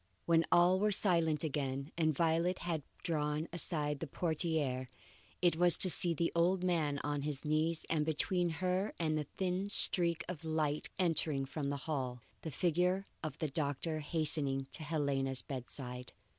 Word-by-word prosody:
When 165 -1 +3
all 180 +2 +5
were 210 +1 +2
still 175 -5 +2
again 145 -2 -2
and 160 -2 +2
Violet 165 +4 +1
had 165 -3 -1 0.2
drawn 150 -1 -1
aside 150 -4 -1
the - - -4
portiere, 150 -5 -2 0.5
it 175 -2 +3
was 175 -1 +5
to 185 - +6
see 170 0 +2
the 165 +2 0
old 180 +2 +2
man 160 -6 0
on 145 -1 -2
his 145 0 -2
knees, 155 +2 +1
and 160 -2 +1
between 175 +3 +1 0.2
her 185 +3 0
and 155 -2 0
the 150 -1 -2
thin 185 +5 -3
streak 170 -5 +4
of 175 -3 -6
light 155 -2 -1
entering 160 -6 +2
from 140 +1 -4
the 140 - -2
hall, 130 -5 -3 0.2
the 160 - -5
figure 180 +5 0 0.2
of 155 -3 -5
the 155 - -2
doctor 150 +2 -1
hastening 145 -3 0
to - - -2
Helena's 140 -4 0
bedside. 125 -1 -5
160 Hz, 160 wpm, -34 LUFS, 145-175 Hz, 0.5 s, to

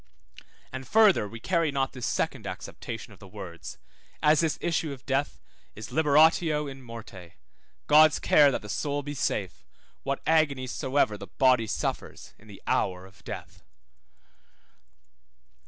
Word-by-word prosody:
And 130 -1 -7
further 210 - +4
we 115 +2 -9
carry 165 +3 0
not 135 -1 -1
this 125 -2 -4
second - - -2
acceptation 115 -2 -7
of 95 - -18
the 100 - -13
words, 85 -3 -9 0.5
as 150 0 +5
this 165 -2 +1
issue 165 -2 -1
of 135 -2 -10
death 135 - -1 0.4
is 105 0 -9
liberatio 155 0 +3
in 135 -1 -9
morte, 105 -7 -11 0.5
God's 155 0 +6
care 145 -2 +5
that 135 - -3
the - - -8
soul 145 +6 -2
be 145 +1 -5
safe, 100 -9 -3 0.4
what 140 0 -3
agonies 140 -6 +2
soever 130 -7 0
the 100 - -8
body 125 +2 +2
suffers - - -4
in 110 - -19
the 100 -2 -13
hour 90 0 0
of 95 0 -19
death. - - -8
135 Hz, 145 wpm, -27 LUFS, 105-150 Hz, 0.5 s, God's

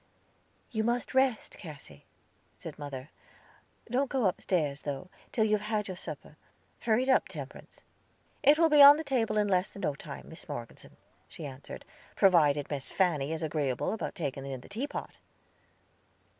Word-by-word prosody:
"You 220 -2 0
must 240 +3 -1
rest, 260 -4 +1
Cassy," 140 - -11 0.5
said - - -9
mother. 140 -1 -7 0.8
"Don't 255 +3 0
go 260 -5 +1
upstairs, 160 -6 0
though, 145 +5 -5 0.2
till 220 - +2
you 215 - 0
have 210 0 +1
had 210 -1 0
your 185 - -5
supper. 155 -3 -8 0.4
Hurry 235 +1 +2
it 265 - -2
up, 260 - +4
Temperance." - - -10 0.6
"It 295 +1 +6
will 330 0 +5
be 300 -1 +7
on 285 +1 +11
the 320 - -3
table 235 -7 0
in 210 -1 +3
less 185 -1 +2
than 200 - -10
no 145 - +1
time, 140 0 -9
Miss 160 0 -12
Morgeson," 120 -5 -8 0.3
she 160 - -9
answered, 135 -1 -9 0.3
"provided 150 -8 +4
Miss 140 -2 -4
Fanny 160 -6 +1
is 160 0 -3
agreeable 145 - -1
about 220 - -4
taking 140 -4 -3
in 135 -2 -5
the - - -15
teapot." 245 +8 -5
180 Hz, 165 wpm, -30 LUFS, 145-225 Hz, 0.8 s, on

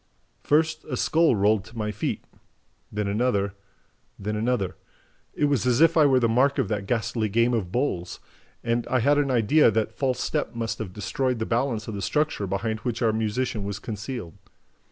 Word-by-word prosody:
"First 155 +1 +1
a 125 - -4
skull 160 -1 +3
rolled 105 0 +2
to 110 +1 -13
my 105 -1 -2
feet... 105 - -3 0.7
then 105 -1 -2
another... 100 -2 0 0.6
then 105 +2 -3
another... 110 -3 -1 0.6
It 150 - +2
was 140 -4 +1
as 125 -1 +3
if 165 +1 +5
I 155 -3 +6
were 130 -2 +4
the 120 - +2
mark 130 +5 +2
of 130 -8 0
that 105 -3 -2
ghastly 110 -1 -1
game 115 +4 +2
of 100 -7 -1
bowls. 95 -8 -2 0.4
And 115 0 0
I 130 - +1
had 145 +4 +4
an 140 -1 +1
idea 125 +5 +4
that 110 -1 0
false 130 -3 0
step 145 -6 -2
must 115 -1 -3
have 110 -5 -5
destroyed 125 +6 -1
the 110 - -2
balance 115 -2 -1
of 110 - -4
the 100 - -4
structure 150 -6 0
behind 110 +4 -2
which 120 0 -3
our 110 -1 +3
musician 110 0 -1
was 100 -1 -4
concealed. 110 - -6
115 Hz, 190 wpm, -25 LUFS, 105-130 Hz, 0.7 s, I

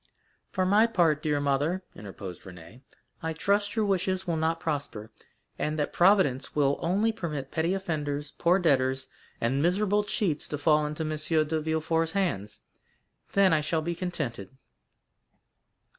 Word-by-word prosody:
"For 185 - 0
my 210 +4 +5
part, 170 -9 +2
dear 150 -2 0
mother," 145 +6 0
interposed 95 -3 -8
Renée, 90 +6 -13 0.4
"I 160 0 -2
trust 205 +5 0
your 220 -2 +1
wishes 190 -1 0
will 170 -3 -1
not 160 +1 0
prosper, 140 -9 -4 0.5
and 155 +1 -1
that 150 - -1
Providence 175 -8 +3
will 140 -1 +2
only 200 +6 +1
permit 150 -10 -5
petty 165 +4 0
offenders, 150 -5 -3
poor 175 +2 +4
debtors, 130 -6 +1 0.3
and 130 +4 0
miserable 205 +5 +2
cheats 200 -7 -1
to 150 - -4
fall 150 0 +3
into 150 +2 -4
M. 155 - -3 0.4
de 160 0 -1
Villefort's 160 +1 0
hands,—then 185 - -2
I 155 - +3
shall 155 +1 -1
be 170 +2 -2
contented." 150 - -4
160 Hz, 145 wpm, -28 LUFS, 145-185 Hz, 0.5 s, my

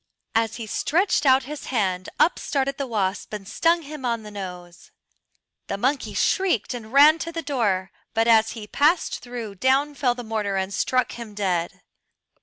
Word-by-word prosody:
As 225 0 +1
he 230 - -6
stretched 320 - +1
out 260 0 +5
his 295 +3 -7
hand 190 -6 -1
up 340 - +3
started 275 -1 -1
the 275 - -2
wasp 200 -4 -2
and 200 -2 -6
stung 335 +10 +2
him 295 -1 -8
on 235 -2 -1
the 210 - -9
nose. 180 -3 -8 0.8
The 200 - -3
monkey 260 +6 -1
shrieked 355 - +1
and 225 -3 -8
ran 295 +4 +7
to 335 - -4
the 330 0 -4
door, 205 -10 0 0.2
but 225 +1 +2
as 225 -1 +4
he 220 -3 -8
passed 300 +10 +1
through 240 -4 -7
down 265 +8 +2
fell 250 -4 +1
the 245 - -7
mortar 215 -3 -2
and 190 +1 -2
struck 255 +4 +1
him 230 -3 -9
dead. 180 -4 -1
235 Hz, 180 wpm, -24 LUFS, 205-280 Hz, 0.8 s, ran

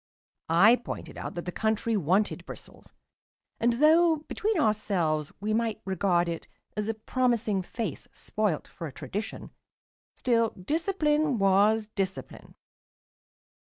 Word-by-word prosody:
I 200 +9 +6
pointed 245 - -7
out - - -6
that 175 - -5
the 180 - -3
country 220 +3 0
wanted 195 +3 +1
bristles; - - -11 0.7
and 235 +1 +3
though, 320 +6 +5
between 420 -3 -1
ourselves, 185 - 0
we 215 +2 -1
might 225 -1 0
regard 185 -2 +1
it 165 -1 -4 0.3
as 210 0 -2
a 225 - -1
promising 225 -3 0
face 185 - -5
spoilt 210 -8 -2
for 165 - -7
a - - -8
tradition, 205 - -6 0.6
still 230 -3 +1
discipline 310 - +1
was 205 +2 +4
discipline. 195 -3 -5
215 Hz, 125 wpm, -28 LUFS, 190-240 Hz, 0.7 s, I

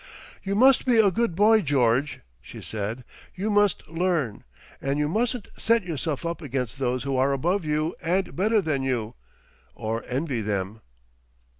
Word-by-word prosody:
"You 195 0 -2
must 260 +4 +5
be 245 -2 +4
a 210 -3 +5
good 230 -3 0
boy, 215 +3 +5
George," 135 - +1 0.2
she - - -11
said. 110 +3 -4 0.3
"You 205 +4 -2
must 205 -4 +2
learn.... 165 - -1 0.4
And 140 +1 -1
you 150 0 +1
mustn't 230 - -1
set 230 -1 +2
yourself 160 -2 -3
up 170 +1 -3
against 135 -3 -4
those 125 -1 -1
who 135 -1 -1
are 135 +2 +2
above 175 +8 0
you 155 +2 0
and 185 +4 -1
better 210 +3 +2
than 150 -4 -1
you.... 120 -4 -2 0.6
Or 110 +1 -3
envy 130 -2 -2
them." 105 +1 -3
155 Hz, 160 wpm, -25 LUFS, 130-200 Hz, 0.6 s, must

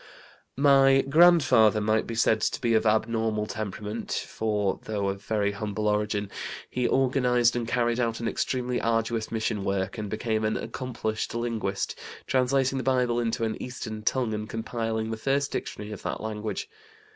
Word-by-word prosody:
"My 135 -1 +6
grandfather 135 -9 +6
might 110 +1 +1
be 115 - -4
said 110 -1 +3
to - - 0
be 115 -2 +1
of 110 0 +3
abnormal 110 0 +1
temperament, 105 +1 -5
for, 105 -3 -1
though 100 -2 -1
of 100 0 -4
very 105 -2 0
humble 105 +1 -3
origin, 105 -1 0 0.4
he 125 -1 0
organized 125 -2 +3
and 120 -2 -2
carried 120 0 +1
out 115 -2 0
an 115 - -2
extremely 125 0 -1
arduous 115 -1 0
mission 110 -2 -1
work 100 +1 -2
and 105 -1 -4
became 110 0 -1
an 110 0 +1
accomplished 115 -4 -4
linguist, 115 -5 -2 0.3
translating 130 +1 +1
the - - -3
Bible 125 -2 +2
into 115 -1 -1
an 110 -1 -2
Eastern 110 -4 -6
tongue 120 0 0
and 105 0 -4
compiling 115 -1 -3
the 110 - -3
first 140 +4 0
dictionary 105 +1 -5
of 105 - -7
that - - -3
language. 110 -1 -4
115 Hz, 160 wpm, -27 LUFS, 110-125 Hz, 0.4 s, My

